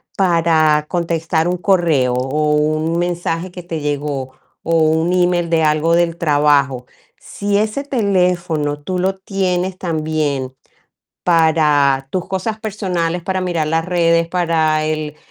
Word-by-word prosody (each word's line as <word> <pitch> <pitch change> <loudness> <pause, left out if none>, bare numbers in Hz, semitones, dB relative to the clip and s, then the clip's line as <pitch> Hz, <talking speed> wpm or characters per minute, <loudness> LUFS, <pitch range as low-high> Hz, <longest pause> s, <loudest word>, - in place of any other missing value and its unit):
Para 165 -4 +2
contestar 165 -1 -1
un 180 - -1
correo, 170 -10 +2
o 150 +4 0
un 155 +2 0
mensaje 175 0 -2
que 180 0 -9
te 165 -2 -5
llegó 145 -3 -3 0.3
o 165 0 +1
un 160 +2 +2
email 175 -1 +1
de 165 -1 +2
algo 155 +2 +2
del 170 -1 +1
trabajo. 145 -5 +2 0.3
Si 205 0 -2
ese 215 +6 -1
teléfono 180 - 0
tú 180 +5 -4
lo 190 +1 0
tienes 190 -1 -2
también 155 -6 -2 0.7
para 150 -5 +3
tus 185 -2 -3
cosas 205 +3 -3
personales, 180 -5 -2
para 190 0 -1
mirar 170 -4 -1
las 165 +1 0
redes, 170 -2 +2
para 160 -3 +1
el 155 -1 -3
165 Hz, 135 wpm, -18 LUFS, 150-180 Hz, 0.7 s, para